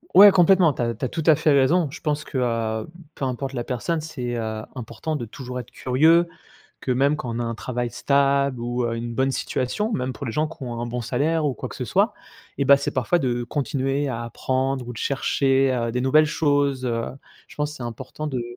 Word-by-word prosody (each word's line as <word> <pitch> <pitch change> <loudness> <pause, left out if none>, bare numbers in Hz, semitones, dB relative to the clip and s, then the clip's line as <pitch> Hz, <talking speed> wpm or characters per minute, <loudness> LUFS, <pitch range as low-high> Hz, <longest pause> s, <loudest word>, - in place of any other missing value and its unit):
Ouais, 200 +2 +11
complètement 180 -3 +5
tu - - -4
as 115 -1 0
tu 115 - -3
as - - 0
tout 160 - -4
à 160 - +8
fait 155 0 +2
raison. 145 +5 +4
Je - - -9
pense 150 -1 -1
que, 135 - -4
heu, 115 -3 -1 0.3
peu 140 - -3
importe 130 +1 -3
la 120 -2 -2
personne, 135 +7 -2
c'est, 125 -6 -4
heu, 110 -1 -3
important 135 +5 -5
de 125 -5 -3
toujours 125 +2 -7
être 125 -1 -8
curieux, 160 +9 +3 0.6
que - - -3
même 140 +4 +2
quand 120 -5 -4
on 115 - -3
a - - -1
un 115 0 -3
travail 120 +2 -3
stable 140 +1 +2
ou, 120 +1 -1
heu, 115 0 -1
une 120 0 -4
bonne 130 +2 +1
situation 135 - -2
même 130 0 -2
pour - - -7
les 115 - -3
gens 155 +4 +1
qui 160 -1 -11
ont 120 -2 -4
un 120 - -2
bon 120 +1 -3
salaire 145 +7 0
ou 140 - 0
quoi - - -6
que - - -8
ce - - -3
soit - - +2 0.5
et 140 - +2
bah, 140 - +8
c'est 140 - -2
parfois 130 +7 +1
de 120 -5 -1
continuer 140 +1 -1
à 120 -2 -3
apprendre 130 +2 -1
ou 120 - -5
de 115 - -9
chercher, 135 -1 +2
heu, 115 -2 -1
des 125 +2 -1
nouvelles 155 +4 +5
choses, 145 -3 +1
heu. 115 -2 0 0.5
Je - - -15
pense 150 0 -1
c'est 140 - -9
important 130 +6 -6
de 130 -5 -2
130 Hz, 235 wpm, -23 LUFS, 120-145 Hz, 0.6 s, Ouais